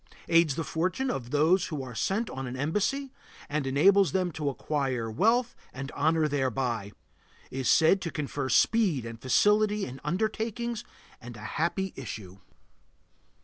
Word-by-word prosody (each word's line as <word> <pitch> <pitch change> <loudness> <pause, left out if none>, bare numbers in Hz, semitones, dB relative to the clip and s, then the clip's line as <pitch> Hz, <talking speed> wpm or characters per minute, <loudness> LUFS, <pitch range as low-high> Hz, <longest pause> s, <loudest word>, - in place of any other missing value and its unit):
Aids 165 -4 +4
the 165 - -2
fortunes 185 - -1
of 120 - -5
those 160 +7 +3
who 150 -5 -4
are 125 -2 -8
sent 195 - -1
on 135 0 -5
an 125 - -5
embassy, 210 - -1 0.3
and 145 -2 -2
enables 190 +8 +4
them 185 -2 +1
to 150 -2 -2
acquire 130 -5 -2
wealth 230 - +2 0.2
and 135 +1 -6
honor 155 +1 +2
thereby. 130 -7 -1 0.6
Is 130 -1 -1
said 170 +4 +5
to 170 - -3
confer 140 -2 -3
speed 180 - +3
and 115 0 -8
facility 210 +8 +3
in 130 +1 -9
undertakings 220 +6 -2 0.4
and 120 -1 -9
a - - -11 0.2
happy 190 +3 -1
issue. 100 -7 -8
155 Hz, 145 wpm, -28 LUFS, 130-195 Hz, 0.6 s, said